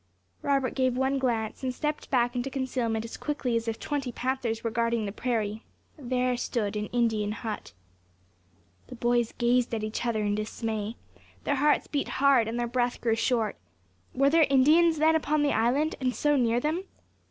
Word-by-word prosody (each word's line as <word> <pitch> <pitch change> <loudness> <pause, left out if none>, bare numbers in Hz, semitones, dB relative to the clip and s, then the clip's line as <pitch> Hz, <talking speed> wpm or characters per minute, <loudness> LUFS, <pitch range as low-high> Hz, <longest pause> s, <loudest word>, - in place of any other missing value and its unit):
Robert 275 -2 +1
gave 255 -2 +1
one 265 +1 +1
glance, 230 -4 -1
and 260 -1 -1
stepped 300 +4 -3
back 245 -1 +2
into 245 +2 -2
concealment 250 -5 -2
as 230 - -7
quickly 285 -5 -2
as 230 0 -1
if 225 -1 -2
twenty 280 -4 -3
panthers 245 -3 -2
were 230 - -1
guarding 230 -1 0
the 200 - -3
prairie. 220 -1 -2 0.3
There 255 -3 0
stood 215 -4 -2
an 210 0 -2
Indian 220 -4 0
hut. 215 - -6 1.1
The - - -9
boys 240 -1 +1
gazed 240 0 +2
at 215 - -3
each 215 +2 -3
other 225 -3 0
in 205 0 0
dismay; 215 +1 -3 0.5
their 285 - 0
hearts 295 +2 +3
beat 285 -2 -2
hard, 265 -4 +4
and 230 +2 -3
their 240 - 0
breath 245 0 -1
grew 225 -2 +1
short. 230 -2 0 0.6
Were 275 +2 +3
there 320 -1 +5
Indians 310 +5 +5
then 315 +1 +4
upon 305 -1 +1
the 285 - +2
island, 260 +8 +2
and 255 -1 0
so 295 0 +2
near 240 -3 +2
them? 315 +8 -1
245 Hz, 180 wpm, -28 LUFS, 225-275 Hz, 1.1 s, there